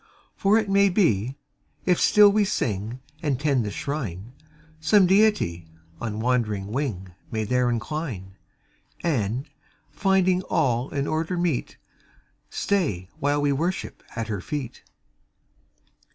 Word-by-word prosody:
"For 200 Hz, +2 st, +3 dB
it 220 Hz, -2 st, 0 dB
may 200 Hz, 0 st, +4 dB
be, 135 Hz, -, +1 dB, 0.5 s
if 180 Hz, -1 st, +2 dB
still 210 Hz, -1 st, +7 dB
we 210 Hz, +1 st, +3 dB
sing 115 Hz, -, -2 dB, 0.2 s
And 145 Hz, -6 st, 0 dB
tend 140 Hz, -4 st, +2 dB
the 105 Hz, -, -3 dB
Shrine, 115 Hz, -, -5 dB, 0.5 s
Some 185 Hz, +5 st, +5 dB
Deity 190 Hz, -, +2 dB, 0.3 s
on 110 Hz, -2 st, -4 dB
wandering 110 Hz, -5 st, 0 dB
wing 110 Hz, -9 st, -3 dB, 0.2 s
May 110 Hz, -1 st, -2 dB
there 125 Hz, +3 st, +1 dB
incline; 120 Hz, -, -4 dB, 0.7 s
And, 130 Hz, -, 0 dB, 0.4 s
finding 190 Hz, -2 st, +2 dB
all 125 Hz, 0 st, +1 dB
in 140 Hz, -1 st, -2 dB
order 160 Hz, +4 st, -1 dB
meet, 170 Hz, -7 st, -1 dB, 0.7 s
Stay 105 Hz, -, -1 dB
while 145 Hz, 0 st, +1 dB
we 145 Hz, -, +3 dB
worship 170 Hz, +7 st, -2 dB
at 115 Hz, -2 st, -3 dB
Her 105 Hz, -4 st, -3 dB
feet." 140 Hz, -1 st, -5 dB
135 Hz, 125 wpm, -25 LUFS, 110-180 Hz, 0.7 s, still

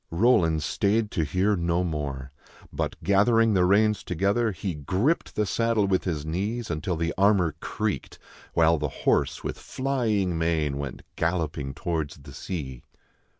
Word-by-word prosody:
Roland 85 Hz, -5 st, +3 dB
stayed 105 Hz, +7 st, +1 dB
to 80 Hz, -, 0 dB
hear 95 Hz, +7 st, +1 dB
no 85 Hz, 0 st, 0 dB
more; 70 Hz, -5 st, -4 dB, 0.4 s
but -, -, -2 dB
gathering 115 Hz, +3 st, +4 dB
the 90 Hz, -2 st, +4 dB
reins 105 Hz, +2 st, +3 dB
together, 100 Hz, +6 st, +1 dB
he 95 Hz, 0 st, -4 dB
gripped 95 Hz, -, -1 dB
the 105 Hz, -, +1 dB
saddle 115 Hz, +1 st, +1 dB
with 95 Hz, -1 st, +1 dB
his 80 Hz, -5 st, -2 dB
knees 105 Hz, +8 st, -2 dB
until 80 Hz, +4 st, -2 dB
the 85 Hz, +1 st, -1 dB
armor 95 Hz, -5 st, +4 dB
creaked, 105 Hz, +2 st, -3 dB, 0.4 s
while 80 Hz, -1 st, +4 dB
the 75 Hz, -1 st, -1 dB, 0.2 s
horse, -, -, +2 dB
with -, -, -4 dB
flying 115 Hz, -9 st, -1 dB
mane, 80 Hz, -4 st, 0 dB
went 70 Hz, -4 st, -6 dB
galloping 80 Hz, -5 st, -2 dB
towards 80 Hz, -1 st, -2 dB
the 70 Hz, 0 st, -13 dB
sea. 65 Hz, -9 st, -5 dB
90 Hz, 150 wpm, -26 LUFS, 80-105 Hz, 0.4 s, gathering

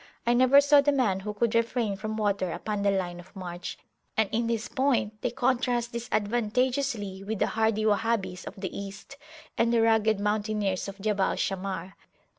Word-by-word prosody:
I 240 Hz, -, +3 dB
never 255 Hz, +3 st, +6 dB
saw 285 Hz, 0 st, +6 dB
the 290 Hz, +1 st, +2 dB
man 235 Hz, -9 st, +1 dB
who 210 Hz, +2 st, -4 dB
could 230 Hz, +1 st, +1 dB
refrain 230 Hz, -2 st, +1 dB
from 215 Hz, +2 st, -4 dB
water 200 Hz, -3 st, 0 dB
upon 210 Hz, +4 st, -3 dB
the 200 Hz, -, +3 dB
line 180 Hz, -3 st, -1 dB
of 175 Hz, +4 st, -15 dB
march; 175 Hz, -2 st, -6 dB, 0.4 s
and 220 Hz, -1 st, +3 dB
in 230 Hz, +1 st, 0 dB
this 230 Hz, -1 st, -1 dB
point 240 Hz, -6 st, 0 dB
they 245 Hz, -, 0 dB
contrast 245 Hz, -1 st, 0 dB
disadvantageously 235 Hz, -1 st, -1 dB
with 215 Hz, +2 st, -3 dB
the -, -, +2 dB
hardy 220 Hz, -1 st, +1 dB
Wahhabis 210 Hz, -3 st, 0 dB
of -, -, -7 dB
the 190 Hz, -2 st, -5 dB
East, 200 Hz, +7 st, -8 dB, 0.4 s
and 230 Hz, 0 st, +3 dB
the 230 Hz, -1 st, +3 dB
rugged 220 Hz, -2 st, +3 dB
mountaineers 210 Hz, -2 st, -1 dB
of 195 Hz, 0 st, -8 dB
Jabal 200 Hz, -1 st, +1 dB
Shammar. 190 Hz, -1 st, -3 dB
215 Hz, 175 wpm, -27 LUFS, 195-235 Hz, 0.4 s, never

